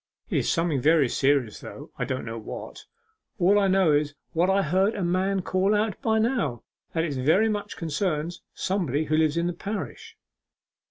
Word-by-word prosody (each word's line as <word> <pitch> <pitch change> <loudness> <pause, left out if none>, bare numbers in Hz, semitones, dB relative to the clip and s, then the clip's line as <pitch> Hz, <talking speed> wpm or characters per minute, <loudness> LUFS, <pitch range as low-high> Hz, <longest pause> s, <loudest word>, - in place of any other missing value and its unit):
'It - - +1
is - - 0
something 165 -6 0
very 155 -1 +4
serious, 135 -3 +1
though - - -10
I - - -2
don't 130 0 -3
know 115 0 -5
what. 110 - -8 0.5
All 200 +2 +4
I 200 - +3
know 190 -4 +4
is 145 0 +1 0.2
what 175 +3 +2
I 195 +1 +3
heard 190 +6 +2
a 195 - -2
man 185 +2 0
call 190 +3 +1
out 210 -1 -1
bynow 220 - 0 0.3
that 165 - +1
it 160 -4 -2
very 160 +12 +3
much 205 -1 -4
concerns 165 0 -2
somebody 165 -7 -1
who 155 0 0
lives 155 0 +2
in 170 - +1
the 175 - -1
parish. 200 +5 -6
170 Hz, 180 wpm, -26 LUFS, 150-195 Hz, 0.5 s, very